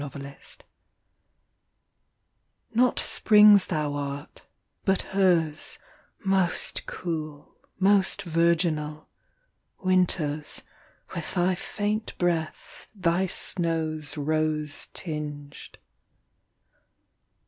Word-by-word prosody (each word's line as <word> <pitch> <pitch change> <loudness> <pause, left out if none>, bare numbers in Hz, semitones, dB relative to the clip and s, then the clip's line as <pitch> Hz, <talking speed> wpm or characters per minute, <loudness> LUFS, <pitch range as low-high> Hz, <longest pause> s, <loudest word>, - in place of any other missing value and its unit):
ARBUTUS 140 0 -8 2.2
Not 250 +2 +3
Spring 210 -1 +6
s 200 -2 +4
Thou 150 -4 -1
art, 140 0 -5 0.4
but 195 -1 +1
her 180 -5 +3
s, 155 - -8 0.5
Most 190 -2 0
cool, 155 -4 -5 0.2
most 195 +1 +3
virginal, 165 -3 0 0.7
Winter 180 -5 +2
s, 150 - -3 0.5
with 170 +2 -5
thy 180 +1 +2
faint 210 +4 -3
breath, 170 -3 -2
thy 185 0 +1
snows 160 -4 -1
Rose 150 0 -1
tinged. 150 -3 -7
165 Hz, 80 wpm, -26 LUFS, 150-185 Hz, 2.2 s, Spring